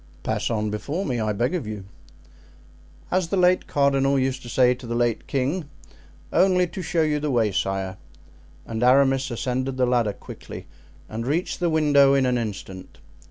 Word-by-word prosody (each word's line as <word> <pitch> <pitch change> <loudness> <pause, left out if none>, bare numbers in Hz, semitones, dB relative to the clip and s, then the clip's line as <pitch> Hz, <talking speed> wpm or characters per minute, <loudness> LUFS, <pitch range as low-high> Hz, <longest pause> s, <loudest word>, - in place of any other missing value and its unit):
"Pass - - -1
on 105 -2 -1
before 145 - -3
me, 125 -3 -1
I 110 -1 0
beg 120 - -1
of 160 -11 -3
you." 105 -3 -6 1.3
"As 185 -1 +1
the 195 - -1
late 180 0 +3
cardinal 140 -1 +2
used 130 0 -1
to 120 - -9
say 125 0 +4
to 125 -1 -11
the 115 - -3
late 120 -1 0
king, 140 +4 -1 0.6
'only 185 -1 +4
to 190 - -6
show 170 -2 0
you 150 -1 +1
the 150 0 -2
way, 115 -5 +2
sire.'" 95 0 -2 0.7
And 110 0 -4
Aramis 135 +1 +4
ascended 130 +2 -2
the 130 - +3
ladder 120 -4 +1
quickly - - -10 0.4
and 115 +2 -5
reached 165 +6 -1
the 175 -1 +1
window 145 -3 +4
in 135 -1 +3
an 125 -1 +1
instant. 95 -4 -7
130 Hz, 175 wpm, -24 LUFS, 115-150 Hz, 1.3 s, say